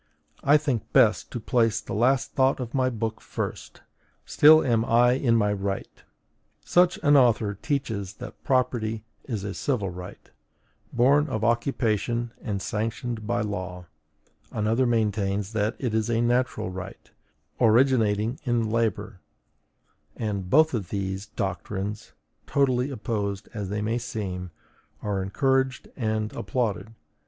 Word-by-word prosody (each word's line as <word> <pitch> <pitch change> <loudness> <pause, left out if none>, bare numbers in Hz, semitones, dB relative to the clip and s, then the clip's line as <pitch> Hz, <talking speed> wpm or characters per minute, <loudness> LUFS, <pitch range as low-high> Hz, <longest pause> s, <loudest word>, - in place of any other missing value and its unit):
I 145 +2 +6
think 140 -8 -2
best - - +4
to - - -5
place 115 0 +1
the - - -7
last 125 +5 +2
thought 135 0 +2
of 125 -2 -5
my 130 -2 +2
book 115 -2 -4
first: - - -6 0.4
still 155 +2 +6
am 115 -3 +2
I 120 +1 +4
in 125 -2 +2
my 105 -2 +2
right. 100 0 -4 0.6
Such 180 0 +3
an 145 -1 +5
author 115 -6 +4
teaches 105 - -3
that 125 +3 -10
property 115 -4 0 0.2
is 110 -7 -4
a 100 -1 -4
civil 105 -9 -1
right, 90 0 -10 0.6
born 140 +5 +4
of 110 -6 -3
occupation 115 -1 0
and 100 -4 -3
sanctioned 110 +1 -3
by 120 +1 0
law; 95 -4 -4 0.7
another 115 +4 +1
maintains 105 -3 0
that 110 +1 0
it 125 -5 -2
is 110 0 0
a 115 -1 +1
natural 120 -5 0
right, 95 +1 -9 0.5
originating 115 -1 +3
in 115 -3 0
labor, 110 -4 -1 0.9
and 100 -4 -3
both 155 +6 +5
of 105 -7 -3
these 95 0 -3
doctrines, 100 +2 -4 0.3
totally 130 -2 +1
opposed 105 -5 -3
as 105 -4 -4
they 105 +1 -2
may 115 +3 0
seem, 95 -6 -5 0.5
are 100 -2 -1
encouraged 130 +6 0
and 110 -3 -2
applauded. 110 +1 -2
115 Hz, 135 wpm, -26 LUFS, 105-125 Hz, 0.9 s, I